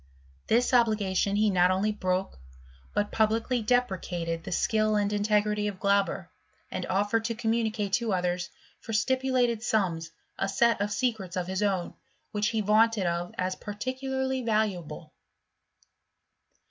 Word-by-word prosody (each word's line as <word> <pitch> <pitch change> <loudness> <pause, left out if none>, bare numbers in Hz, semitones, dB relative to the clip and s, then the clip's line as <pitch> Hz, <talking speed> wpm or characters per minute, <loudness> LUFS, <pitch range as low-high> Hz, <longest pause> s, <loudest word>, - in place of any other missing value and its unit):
This 245 +3 +2
obligation 210 -5 +2
he 210 0 +3
not 180 -1 +4
only 190 +3 +1
broke, 185 - -2 0.5
but 205 - -1
publicly 225 +3 +1
deprecated 185 -8 -1
the - - -7
skill 215 +3 +1
and 205 0 +1
in 205 - 0
tegrity 210 0 +1
of 195 -2 -9
Glauber, 200 -3 +1 0.4
and 185 - -4
offered 205 +4 +1
to 230 0 -1
communicate 220 -3 -1
to 235 -2 +1
others, 180 -1 -1 0.3
for 225 - -7
stipulated 250 0 +1
sums, 180 -8 0 0.3
a 195 - 0
set 230 +2 +2
of 205 0 -1
secrets 215 -7 -1
of 180 - -1
his 190 +2 -3
own» 195 -4 0 0.4
which 210 0 0
he 220 -1 0
vaunted 215 0 +3
of 170 0 -2
as 185 0 0
particularly 260 +4 -3
valuable. 215 -8 -2
210 Hz, 140 wpm, -28 LUFS, 190-230 Hz, 0.5 s, not